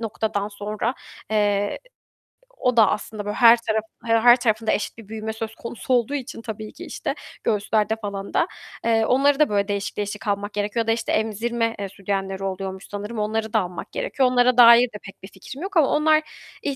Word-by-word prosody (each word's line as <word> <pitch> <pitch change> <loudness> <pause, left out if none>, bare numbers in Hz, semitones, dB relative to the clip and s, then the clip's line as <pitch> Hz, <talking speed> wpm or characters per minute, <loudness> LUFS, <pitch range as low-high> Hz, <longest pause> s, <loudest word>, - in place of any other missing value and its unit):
noktadan 215 -2 -2
sonra, 210 +3 -3 0.4
eee, 205 -1 +1 0.8
o 250 -1 0
da 220 - +7
aslında 210 -1 -4
böyle 210 0 -3
her 235 -1 +7
taraf 220 -2 -1 0.2
her 230 +1 +6
tarafında 225 -3 0
eşit 210 - -2
bir 225 -3 -12
büyüme 220 0 -5
söz 220 0 -6
konusu 235 +3 -4
olduğu 245 +2 +2
için 250 -4 -6
tabii 215 -1 -7
ki 345 +5 -9
işte - - -4 0.3
göğüslerde 215 0 +1
falan 200 -2 -6
da, - - +2 0.4
eee, 225 -1 +3
onları 275 +4 +3
da 305 - +4
böyle 200 0 +1
değişik 200 0 -3
değişik 210 +1 -4
almak 205 +1 -2
gerekiyor 210 +3 -1
ya - - -17
da, 225 - +3
işte, 225 0 -1
emzirme, 230 +2 -1
eee, 200 -1 -4
sütyenleri 195 0 -3
oluyormuş 190 0 -5
sanırım, 210 +2 -5
onları 220 +1 -2
da 220 - +4
almak 180 -2 -6
gerekiyor. - - 0
Onlara 250 0 +3
dair 235 0 +9
de 220 -3 -9
pek 200 - -13
bir 190 - -7
fikrim 200 +9 -11
yok 390 -2 -3
ama 295 - +5
onlar 310 +1 +3 0.4
ih 280 -2 -2
220 Hz, 195 wpm, -23 LUFS, 205-235 Hz, 0.8 s, dair